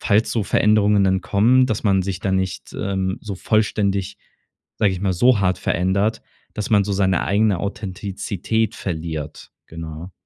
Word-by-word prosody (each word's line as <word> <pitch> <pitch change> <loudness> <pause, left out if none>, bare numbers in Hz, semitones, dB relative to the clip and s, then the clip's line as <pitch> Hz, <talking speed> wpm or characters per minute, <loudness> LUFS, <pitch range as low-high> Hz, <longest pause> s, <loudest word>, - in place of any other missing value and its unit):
falls 110 +1 +2
so 115 - 0
Veränderungen 105 -1 +3
dann 95 0 +2
kommen, 125 +6 +3
dass 110 -3 -2
man 95 -2 +3
sich 95 -1 -4
da 95 - -1
nicht, 95 -1 -2
ähm, 95 +2 -2
so 105 -3 -6
vollständig, 100 -2 0 0.6
sage 100 -3 +3
ich 90 - -5
mal, 95 -2 +1
so 120 +3 +4
hart 95 -1 +1
verändert, 100 +5 0 0.3
dass 105 - -4
man 105 -2 +5
so 100 - -2
seine 95 -2 +1
eigene 100 -2 +2
Authentizität 100 +2 -3
verliert, 80 -4 -5 0.2
genau. 80 +2 -8
100 Hz, 160 wpm, -21 LUFS, 95-105 Hz, 0.6 s, man